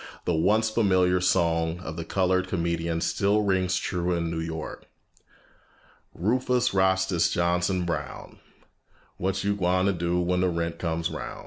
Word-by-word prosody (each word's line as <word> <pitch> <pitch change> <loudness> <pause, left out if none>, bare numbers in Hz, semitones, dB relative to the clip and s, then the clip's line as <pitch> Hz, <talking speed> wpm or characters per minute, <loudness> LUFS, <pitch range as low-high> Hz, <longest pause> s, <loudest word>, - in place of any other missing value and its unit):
The 90 - +1
once 105 +7 +2
familiar 95 -5 +2
song 85 -2 +1
of 80 -2 -6
the 85 - -4
colored 95 +1 +1
comedian 85 -2 -1
still 105 +4 +1
rings 95 -2 +1
true 90 -1 -1
in 85 -1 -1
New 80 - -3
York: 80 -1 -6 1.3
"Rufus 125 +6 +1
Rastus 95 -3 +2
Johnson 90 +1 0
Brown, 75 -5 -5 0.8
What 95 +1 -2
you 100 0 +1
gwine 90 -1 +1
ter 100 - +3
do 85 0 -1
when 90 +1 0
de 90 - +2
rent 85 -1 -3
comes 85 -1 -2
roun'?" - - -6
90 Hz, 145 wpm, -26 LUFS, 85-95 Hz, 1.3 s, ter